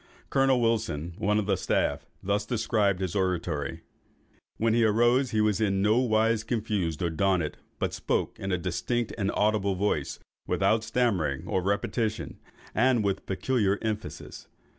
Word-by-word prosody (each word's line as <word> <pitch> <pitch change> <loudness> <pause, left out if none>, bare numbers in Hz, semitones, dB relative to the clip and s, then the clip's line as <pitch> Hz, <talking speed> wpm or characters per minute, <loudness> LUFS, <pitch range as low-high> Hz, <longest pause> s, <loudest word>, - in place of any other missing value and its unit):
Colonel 135 -2 +3
Wilson, 110 -9 0
one 105 +1 +2
of 105 - 0
the 100 -1 +2
staff, - - -1 0.2
thus 100 +2 0
describes 105 -4 0
his 95 -3 -2
oratory:—"When 95 +4 -3
he 115 0 +3
arose, 120 +4 +3
he 110 -2 +1
was 105 -1 +1
in 100 -2 +1
no 110 +3 +4
wise 110 -2 +2
confused 105 - -2
or 85 - 0
daunted, 90 -2 0 0.2
but - - -2
spoke - - -2
in 95 - -3
a 90 - +2
distinct 95 +7 -2
and 100 -3 -1
audible 105 -2 +1
voice, 100 +3 -1 0.3
without 110 0 +2
stammering 105 - 0
or 95 - 0
repetition, 105 +3 -2 0.3
and 125 -1 +3
with 100 -1 -2
peculiar 100 0 +1
emphasis. 110 -1 -5
105 Hz, 145 wpm, -27 LUFS, 95-115 Hz, 0.3 s, no